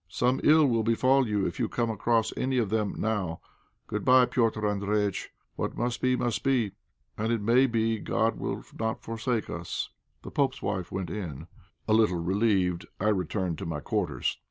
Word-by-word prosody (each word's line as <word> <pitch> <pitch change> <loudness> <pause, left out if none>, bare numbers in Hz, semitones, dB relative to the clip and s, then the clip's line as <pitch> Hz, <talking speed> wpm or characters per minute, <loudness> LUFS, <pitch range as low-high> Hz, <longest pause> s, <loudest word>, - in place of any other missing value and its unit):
Some 125 +8 +1
ill 155 0 +6
will 115 -4 +2
befall 130 +4 +3
you 105 -2 0
if - - -3
you 115 - 0
come 115 -2 0
across 110 +1 +1
any 130 0 0
of 110 -5 0
them 105 -2 0
now. 100 -7 -1 0.5
Good 105 -1 -3
bye, 130 0 +6
Petr' 115 -3 0
Andréjïtch. 105 -1 0 0.3
What - - -3
must 120 0 -1
be, 130 0 +3
must 115 -5 -1
be; 125 -7 +2 0.5
and 110 +2 0
it 115 - +1
may 120 +6 +4
be 115 -2 0
God - - 0
will - - -3 0.2
not 110 0 -2
forsake 115 0 -2
us." - - -4 0.3
The - - -8
pope's 140 -1 +1
wife 95 -3 -2
went 95 -1 -3
in; 80 -8 -5 0.4
a 110 - +3
little 110 -5 +4
relieved, 95 0 +1
I 105 - +2
returned 90 -3 -1
to - - -5
my 80 -3 -3
quarters. - - -2
110 Hz, 180 wpm, -28 LUFS, 100-120 Hz, 0.5 s, ill